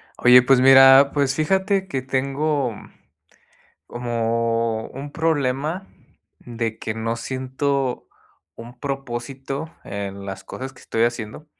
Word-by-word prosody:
Oye, 125 +1 +7
pues 125 0 +4
mira, 135 +1 +8
pues 140 -2 +1
fíjate 190 +5 0
que 135 -7 -3
tengo 135 0 -1 1.1
como 115 -1 -1
un 140 +2 -9
problema, 155 +3 -1 0.5
de 115 -2 -4
que 110 - -4
no 115 +1 -3
siento 130 +1 -2 0.5
un 120 +2 -12
propósito 135 +3 -5
en 100 -1 -6
las 95 -1 -7
cosas 130 +1 -7
que 135 - -18
estoy 115 0 0
haciendo. 115 +4 -4
130 Hz, 115 wpm, -22 LUFS, 115-140 Hz, 1.1 s, mira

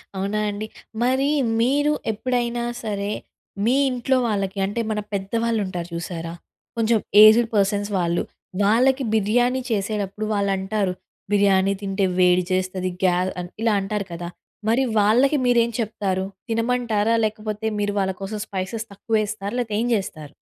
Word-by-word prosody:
అవునా 200 +2 -1
అండి. 210 +1 -4 0.4
మరి 260 +3 +2 0.3
మీరు 290 +4 +2 0.2
ఎప్పుడైనా 240 +1 -1 0.2
సరే, 205 -1 -2 0.5
మీ 245 +3 +3
ఇంట్లో 255 +1 +1
వాళ్ళకి 195 -2 -2
అంటే 205 +4 -2
మన 210 - -1
పెద్దవాళ్ళు 225 +3 0
ఉంటారు 175 -2 -5
చూశారా? 170 -1 -5 0.4
కొంచెం 230 -1 +3 0.2
ఏజ్డ్ 225 +2 +7
పర్సన్స్ 205 +1 +1
వాళ్ళు. 170 -1 0 0.4
వాళ్ళకి 255 +6 +3
బిర్యానీ 245 +5 +2
చేసేటప్పుడు 205 0 -2
వాళ్ళు 200 -1 +1
అంటారు 190 -1 -1 0.4
"బిర్యానీ 200 -1 +3
తింటే 195 0 0
వేడి 180 0 +5
చేస్తది 185 0 -1
గ్యా" 180 -1 +4 0.2
ఆహ్, 175 - -7
ఇలా 225 -2 +3
అంటారు 200 0 -2
కదా. 170 0 -5 0.4
మరి 240 +4 +3 0.2
వాళ్ళకి 250 +8 +4
మీరేం 235 -1 +4
చెప్తారు. 195 -4 -1 0.2
తినమంటారా? 230 -1 +1
లేకపోతే 215 0 -4
మీరు 205 0 0
వాళ్ళ 190 -1 +1
కోసం 210 +2 -4
స్పైసెస్ 200 +4 -4
తక్కువ 200 +3 -7
వేస్తారా 205 -1 -4
లేకపోతే 220 -4 -2
ఏం 240 - 0
చేస్తారు? 155 -7 -5
210 Hz, 140 wpm, -23 LUFS, 195-230 Hz, 0.5 s, ఏజ్డ్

